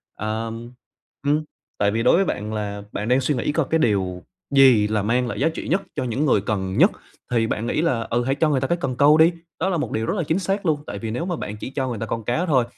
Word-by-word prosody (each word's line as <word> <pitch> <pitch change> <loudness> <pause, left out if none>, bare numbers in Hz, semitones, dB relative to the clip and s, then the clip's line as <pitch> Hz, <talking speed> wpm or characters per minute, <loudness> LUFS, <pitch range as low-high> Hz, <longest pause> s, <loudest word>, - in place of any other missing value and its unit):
ờm, 115 +2 -4 0.6
ừm, 150 +2 +2 0.3
tại 100 0 +2
vì 115 +2 -1
đối - - +5
với 195 +3 +3
bạn 105 - -3
là 100 -1 -4
bạn 105 - -4
đang 125 +2 +3
suy 140 +3 0
nghĩ 125 +4 -1
coi 155 0 0
cái 160 - +2
điều 95 - 0 0.3
gì 130 -6 +6
là 105 -1 0
mang 120 +4 +1
lại - - -4
giá 150 +5 +3
trị 160 - -6
nhất 185 +4 +1
cho 135 - -1
những 125 +4 -1
người 125 -8 +3
cần 95 -2 -2
nhất - - +6 0.4
thì 115 -2 +2
bạn 115 +1 -2
nghĩ 155 - 0
là, 130 -9 +1
ừ, 120 +1 +1
hãy 135 +2 0
cho 155 +2 +2
người 135 -3 +1
ta 135 - 0
cái 175 - +1
cần 130 -2 -2
câu 145 +4 +5
đi, 160 +2 +6 0.3
đó 185 - +1
là 180 - 0
một 150 - -3
điều 110 - -1
rất - - -1
là 175 - 0
chính 160 +4 0
xác 195 +1 -2
luôn, 150 -3 +1
tại 100 - -5
vì 110 0 -4
nếu 145 +9 -2
mà 180 -1 -2
bạn 105 -8 -6
chỉ 105 - -6
cho 135 -2 -1
người 120 -4 -4
ta 115 - -2
con 115 0 -4
cá 125 +11 0
thôi 135 -8 +3
125 Hz, 285 wpm, -22 LUFS, 110-155 Hz, 0.6 s, gì